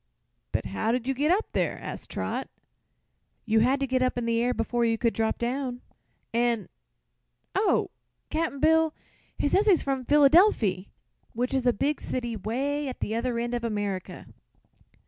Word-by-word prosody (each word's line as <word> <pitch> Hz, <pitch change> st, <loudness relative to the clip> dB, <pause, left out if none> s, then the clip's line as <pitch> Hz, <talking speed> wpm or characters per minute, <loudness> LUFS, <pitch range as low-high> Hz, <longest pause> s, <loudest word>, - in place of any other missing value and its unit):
"But -, -, -1 dB
how 160 Hz, -, -1 dB
did 250 Hz, 0 st, -1 dB
you 270 Hz, -, +1 dB
get 290 Hz, +4 st, 0 dB
up 390 Hz, +5 st, +1 dB
there?" -, -, 0 dB
asked -, -, -7 dB
Trot. -, -, -3 dB, 1.0 s
"You 220 Hz, -1 st, +3 dB
had 255 Hz, +5 st, +3 dB
to -, -, +2 dB
get 260 Hz, -1 st, 0 dB
up 255 Hz, -1 st, +1 dB
in 240 Hz, -, -1 dB
the 230 Hz, 0 st, +1 dB
air 245 Hz, +1 st, +2 dB
before 240 Hz, 0 st, -1 dB
you 225 Hz, -1 st, +2 dB
could 230 Hz, 0 st, +1 dB
drop 220 Hz, 0 st, 0 dB
down, 250 Hz, +1 st, -2 dB, 0.5 s
an' 235 Hz, -4 st, +1 dB, 0.8 s
oh, -, -, +1 dB, 0.4 s
Cap'n 315 Hz, -3 st, -1 dB
Bill! 320 Hz, +1 st, +3 dB, 0.4 s
he -, -, +1 dB
says 395 Hz, +8 st, +2 dB
he's 375 Hz, -5 st, +5 dB
from 270 Hz, -2 st, -2 dB
Phillydelfy, 285 Hz, -, +4 dB, 0.5 s
which 245 Hz, +3 st, -2 dB
is 260 Hz, -2 st, +1 dB
a -, -, +6 dB
big 285 Hz, +7 st, -1 dB
city 240 Hz, -2 st, -3 dB
way 275 Hz, +8 st, -2 dB
at 255 Hz, -, -6 dB
the 215 Hz, -, -2 dB
other 235 Hz, +1 st, -1 dB
end 240 Hz, +1 st, -2 dB
of 240 Hz, -1 st, -2 dB
America." 205 Hz, -4 st, -3 dB
245 Hz, 170 wpm, -27 LUFS, 230-280 Hz, 1.0 s, a